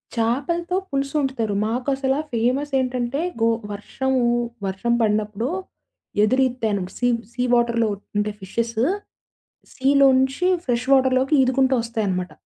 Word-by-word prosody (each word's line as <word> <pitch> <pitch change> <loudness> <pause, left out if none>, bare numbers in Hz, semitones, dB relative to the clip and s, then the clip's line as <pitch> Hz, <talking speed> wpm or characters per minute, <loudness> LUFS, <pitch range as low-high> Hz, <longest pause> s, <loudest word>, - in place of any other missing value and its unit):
చేపలతో 280 +10 0
పులుసు 275 0 -2
వండుతారు. 250 -7 -1
మాకు 245 +4 -2
అసల 265 0 0 0.2
ఫేమస్ 255 +6 0
ఏంటంటే, 255 +2 -1 0.2
గో 225 - +4 0.2
వర్షము 260 +6 -1 0.5
వర్షం 195 +5 -1
పడినప్పుడు 215 +2 0 0.8
ఎదురీత్తాయి. 240 -5 +1
సీ 245 - +1 0.3
సీ 250 +1 -1
వాటర్‌లో 235 -1 +2 0.3
ఉంటే 210 0 0
ఫిషెస్. 230 +4 -3 1.0
సీలోంచి 270 +3 +3 0.2
ఫ్రెష్ 245 0 -1
వాటర్‌లోకి 260 +1 +3
ఈదుకుంటూ 265 +1 +2
వస్తాయనమాట. 205 -6 -2
250 Hz, 105 wpm, -22 LUFS, 225-265 Hz, 1.0 s, గో